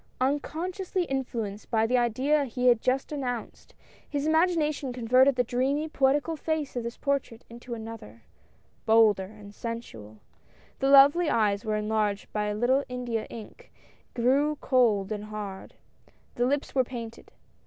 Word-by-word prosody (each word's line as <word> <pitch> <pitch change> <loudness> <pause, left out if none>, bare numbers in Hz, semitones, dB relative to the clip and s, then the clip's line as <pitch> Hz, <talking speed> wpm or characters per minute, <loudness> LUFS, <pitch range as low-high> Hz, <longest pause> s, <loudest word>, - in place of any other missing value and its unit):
Unconsciously 350 +8 -1
influenced 235 - -4
by 220 -1 +2
the 245 +3 +1
idea 260 +5 +2
he 250 0 -3
had 240 -2 +5
just 260 +3 0
announced, 250 -6 -5 0.3
his 285 0 -2
imagination 315 -4 +1
con 245 -2 -6
verted 260 +3 +5
the 245 - +2
dreamy, 265 +6 0
poetical 290 +2 +1
face 310 -3 -3
of 245 - -1
this 235 +1 -6
portrait 280 -5 -2
into 235 +1 -7
another 220 - -10 0.3
— - - -37
bolder 220 -4 +5
and 205 0 -13
sensual. 160 - -7 0.6
The 270 - +1
lovely 285 +5 +7
eyes 205 -5 +1
were 215 -1 -1
enlarged 210 -1 -1
by 210 0 -1
a 210 0 -2
little 255 +5 +2
India 245 -3 -3
ink, 225 -2 -11 0.4
and 235 -1 -2
grew 285 +4 +3
cold 230 -8 +2
and 210 -1 -4
hard. 210 -2 -7 0.6
The 245 +1 0
lips 285 +2 -1
were 260 - +3
painted. 230 -2 -8
245 Hz, 155 wpm, -27 LUFS, 220-280 Hz, 0.6 s, lovely